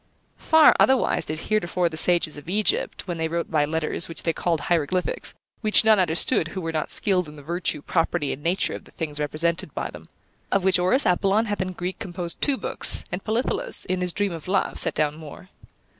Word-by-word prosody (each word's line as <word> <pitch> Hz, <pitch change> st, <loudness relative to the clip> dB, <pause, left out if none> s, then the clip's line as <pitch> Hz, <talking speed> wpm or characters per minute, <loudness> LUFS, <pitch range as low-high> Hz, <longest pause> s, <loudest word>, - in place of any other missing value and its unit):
Far 320 Hz, -1 st, +6 dB
otherwise 265 Hz, -1 st, +3 dB
did 155 Hz, +1 st, -4 dB
heretofore 180 Hz, -4 st, 0 dB
the 165 Hz, -, -5 dB
sages 170 Hz, -1 st, +3 dB
of 145 Hz, +3 st, -11 dB
Egypt, 210 Hz, +1 st, -1 dB
when 175 Hz, -2 st, -4 dB
they 160 Hz, -, 0 dB
wrote 170 Hz, +1 st, -3 dB
by 150 Hz, -2 st, +2 dB
letters, 160 Hz, +2 st, -2 dB
which 165 Hz, -, -7 dB
they 165 Hz, -, 0 dB
called 165 Hz, -3 st, -1 dB
hieroglyphics, 175 Hz, +2 st, -1 dB, 0.3 s
which 215 Hz, -1 st, +5 dB
none 220 Hz, -2 st, +5 dB
understood 175 Hz, +2 st, +2 dB
who 185 Hz, +3 st, -6 dB
were 165 Hz, -1 st, -3 dB
not 155 Hz, -1 st, -3 dB
skilled 185 Hz, -4 st, +2 dB
in 150 Hz, -, -12 dB
the 145 Hz, -, -12 dB
virtue, 170 Hz, -2 st, -1 dB
property, 165 Hz, -3 st, -1 dB
and 140 Hz, -, -9 dB
nature 175 Hz, +5 st, 0 dB
of -, -, -8 dB
the -, -, -17 dB
things 150 Hz, -3 st, -5 dB
represented 170 Hz, +5 st, -1 dB
by -, -, -3 dB
them. -, -, -13 dB, 0.4 s
Of 195 Hz, -, +1 dB
which 190 Hz, -1 st, +3 dB
Orus 185 Hz, +11 st, +2 dB
Apollon 195 Hz, +4 st, +2 dB
hath 205 Hz, -3 st, -3 dB
in 185 Hz, 0 st, -3 dB
Greek 180 Hz, +1 st, -5 dB
composed 175 Hz, -4 st, -5 dB
two 280 Hz, -2 st, +3 dB
books, -, -, +1 dB
and 180 Hz, +2 st, -4 dB
Polyphilus, 405 Hz, -, -1 dB
in 185 Hz, 0 st, -2 dB
his 180 Hz, -1 st, -1 dB
Dream 200 Hz, +2 st, -1 dB
of 165 Hz, -1 st, -8 dB
Love, 195 Hz, +1 st, 0 dB
set -, -, +3 dB
down 150 Hz, 0 st, 0 dB
more. 160 Hz, +4 st, -11 dB
175 Hz, 210 wpm, -24 LUFS, 160-195 Hz, 0.4 s, Far